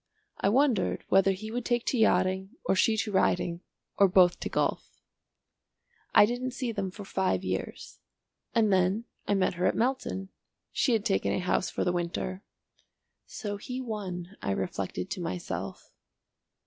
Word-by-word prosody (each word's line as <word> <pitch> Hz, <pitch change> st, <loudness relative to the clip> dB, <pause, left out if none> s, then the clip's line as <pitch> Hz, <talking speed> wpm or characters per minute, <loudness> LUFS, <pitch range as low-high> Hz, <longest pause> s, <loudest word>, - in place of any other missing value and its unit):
I -, -, +2 dB
wondered 250 Hz, -3 st, +2 dB
whether 195 Hz, 0 st, +5 dB
he 215 Hz, +3 st, -5 dB
would 245 Hz, +1 st, -2 dB
take 240 Hz, 0 st, 0 dB
to 255 Hz, -, 0 dB
yachting 190 Hz, -2 st, +2 dB
or -, -, +2 dB
she 220 Hz, +3 st, +3 dB
to 215 Hz, 0 st, -1 dB
riding 175 Hz, -3 st, +1 dB, 0.4 s
or 200 Hz, -, +7 dB
both 180 Hz, -1 st, +5 dB
to -, -, -3 dB
golf. -, -, -2 dB, 1.2 s
I -, -, +9 dB
didn't 245 Hz, +2 st, -3 dB
see 250 Hz, -4 st, -2 dB
them 200 Hz, -3 st, -2 dB
for 200 Hz, +2 st, -9 dB
five 190 Hz, -, 0 dB
years. 95 Hz, 0 st, -4 dB, 0.6 s
And 215 Hz, -3 st, +4 dB
then, 190 Hz, +5 st, +2 dB, 0.2 s
I 205 Hz, -, +2 dB
met 190 Hz, -1 st, +2 dB
her 180 Hz, +1 st, +1 dB
at -, -, +1 dB
Melton. 235 Hz, -6 st, -1 dB, 0.4 s
She 250 Hz, -, +2 dB
had 220 Hz, -2 st, +1 dB
taken 195 Hz, -4 st, +1 dB
a -, -, 0 dB
house 185 Hz, 0 st, 0 dB
for -, -, -2 dB
the 180 Hz, -, +1 dB
winter. 175 Hz, +2 st, -3 dB, 0.9 s
"So 205 Hz, -2 st, -5 dB
he 250 Hz, +5 st, -5 dB
won," 200 Hz, -6 st, -5 dB
I -, -, -3 dB
reflected 95 Hz, -1 st, -3 dB
to 185 Hz, -, -3 dB
myself. 95 Hz, -, -5 dB
195 Hz, 160 wpm, -29 LUFS, 180-225 Hz, 1.2 s, I